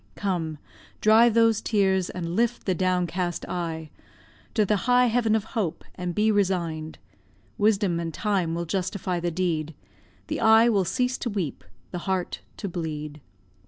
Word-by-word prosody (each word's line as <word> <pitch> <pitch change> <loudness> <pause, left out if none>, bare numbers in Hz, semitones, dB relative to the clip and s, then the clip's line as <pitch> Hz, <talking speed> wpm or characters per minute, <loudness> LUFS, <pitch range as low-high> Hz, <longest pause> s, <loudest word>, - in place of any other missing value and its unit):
Come, 170 -6 -2 0.4
dry 220 +2 +6
those 225 -1 +3
tears, 190 -4 +1
and 170 -1 -4
lift 235 +2 0
the 190 - +2
downcast 180 -1 -1
eye 160 -3 -4 0.6
To 215 -3 +3
the 210 - +2
high 250 0 +6
heaven 225 -2 +2
of 220 - 0
hope, 210 -6 -3
and 180 -1 -4
be 215 +1 +3
resign'd; 170 -6 -1 0.6
Wisdom 200 -4 +2
and 165 -1 -3
time 185 -2 0
will 170 0 -2
justify 185 0 -2
the 175 0 -1
deed, 165 -3 -2 0.5
The - - -3
eye 220 +1 +6
will 200 -5 +2
cease 250 +6 0
to 240 - -2
weep, 190 - -3 0.3
the 175 - -4
heart 185 -2 -1 0.2
to 200 - -4
bleed. 150 -4 -5
185 Hz, 155 wpm, -26 LUFS, 170-215 Hz, 0.6 s, dry